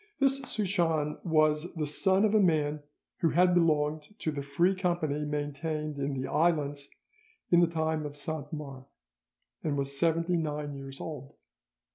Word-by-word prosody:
This 275 0 +3
Souchon 170 -9 0
was 155 0 +2
the 155 -2 -1
son 190 +7 +2
of 215 - +1
a 215 - +5
man 155 -5 +2 0.4
who 165 - +3
had 180 +3 +4
belonged 155 +1 +1
to 160 - -2
the 145 -1 -4
Free 140 +7 +2
Company 170 -6 -1
maintained 150 +1 -3
in 140 -1 -2
the 130 - -3
islands 145 -3 0 0.6
in 175 - +7
the 175 - +5
time 160 -2 -1
of 145 0 -10
Saint 150 0 -4
Mars, 140 -4 -7 0.8
and 145 -2 -1
was 140 0 -1
seventy 165 +3 +1
nine 150 -2 -3
years 135 0 -8
old. 140 -4 -7
155 Hz, 155 wpm, -29 LUFS, 145-170 Hz, 0.8 s, in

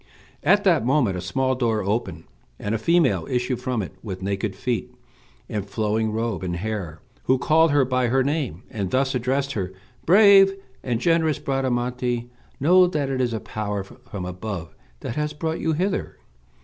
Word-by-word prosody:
At - - +4
that - - +4
moment 125 -6 +2
a 90 - -4
small 130 +5 0
door 115 -4 0
opened, 105 +5 -2 0.3
and 105 - -3
a 115 - 0
female 130 - +2
issued 125 0 -1
from 125 -4 -1
it 90 - -8
with 95 -3 -6
naked 100 0 -2
feet, 120 +4 -2 0.6
and 100 -2 -4
flowing 110 +1 0
robe 110 -3 -2
and 90 -2 -3
hair, 90 -5 -4 0.2
who 130 - +3
called 155 +6 +4
her 145 -2 +3
by 125 -1 +1
her 130 +2 +2
name, 140 - -2
and 100 -5 -3
thus 135 +3 +1
addressed 135 +3 0
her: 95 -7 -3 0.4
"Brave 195 +1 +7 0.3
and 120 -3 -1
generous 160 +1 +2
Bradamante, 125 -2 -1 0.3
know 180 +6 +6
that 150 -5 -1
it 130 -1 0
is 125 -2 +1
a 110 - -2
power 105 -2 -4
from 95 -1 -9
above 90 -2 -6 0.3
that 115 - -5
has 150 0 -1
brought 160 +2 -3
you 160 - 0
hither. 185 +5 -2
125 Hz, 175 wpm, -23 LUFS, 105-140 Hz, 0.6 s, Brave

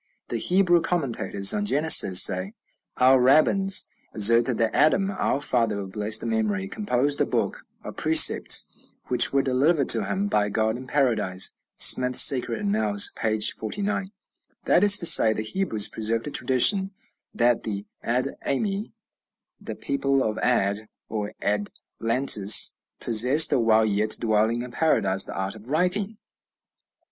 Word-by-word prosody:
The 120 - -4
Hebrew 175 - +1
commentators 120 - 0
on 205 0 -4
Genesis 145 - +5
say, 95 +3 0 0.4
"Our 130 0 +3
rabbins 185 +9 +2 0.3
assert 115 +3 +3
that 115 -3 -2
Adam, 195 +6 0
our 185 -7 -3
father 115 -7 -1
of 95 -1 -8
blessed 110 +2 -1
memory, 105 -4 -3
composed 145 - -2
a - - +1
book - - -5 0.2
of - - -11
precepts, 320 0 +4 0.4
which - - +4
were 140 0 0
delivered 140 +3 -1
to 110 -3 +1
him 100 0 -4
by 105 0 -1
God 110 +1 -2
in 130 +1 -11
Paradise." 110 -10 -1 0.2
(Smith's 125 0 +4
"Sacred 120 -3 +4
Annals," 105 0 -1
p. 110 -1 -3
49.) 190 - -3 0.5
That 180 - +1
is 205 0 +7
to 175 - +1
say, 110 -8 +6
the 110 - -6
Hebrews 110 - -2
preserved 115 +1 -4
a 150 - -7
tradition 190 - 0 0.4
that 120 0 -1
the 100 -2 -7 0.2
Ad 125 +3 -3
ami, 200 +7 -4 0.7
the - - -9
people 140 -1 -2
of 110 -1 -4
Ad, 110 -3 -2 0.2
or 105 -2 -6
Adlantis, 105 +1 +1 0.2
possessed, 125 +8 +3
while 110 -2 +1
yet 105 +1 -1
dwelling 110 +1 -1
in 125 - -11
Paradise, 100 -10 0
the - - -10
art 95 0 -4
of 110 +3 -14
writing. 185 +7 -2
120 Hz, 140 wpm, -22 LUFS, 105-150 Hz, 0.7 s, is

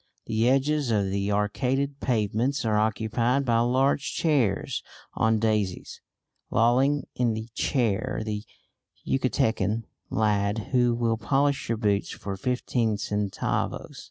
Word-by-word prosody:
The 115 +2 +1
edges 140 +1 +2
of 100 -4 +1
the 100 +1 -1
arcaded 130 +7 0
pavements 120 +2 0
are 110 -1 +2
occupied 115 +5 +1
by 115 -2 +3
large 130 +4 +1
chairs 140 - +1 0.3
on 110 0 +2
daises; 105 -4 -1 0.5
lolling 130 +5 +3
in 120 -3 +1
the 110 +1 -6
chair 120 -1 0
the 105 -1 -3 0.6
Yucatecan 115 -5 +1 0.3
lad 105 0 0
who 120 -2 +3
will 115 -1 0
polish 140 +3 0
your 115 - +1
boots 105 -2 0
for 100 -1 -5
fifteen 115 0 0
centavos. 105 -1 -2
115 Hz, 120 wpm, -26 LUFS, 105-130 Hz, 0.6 s, by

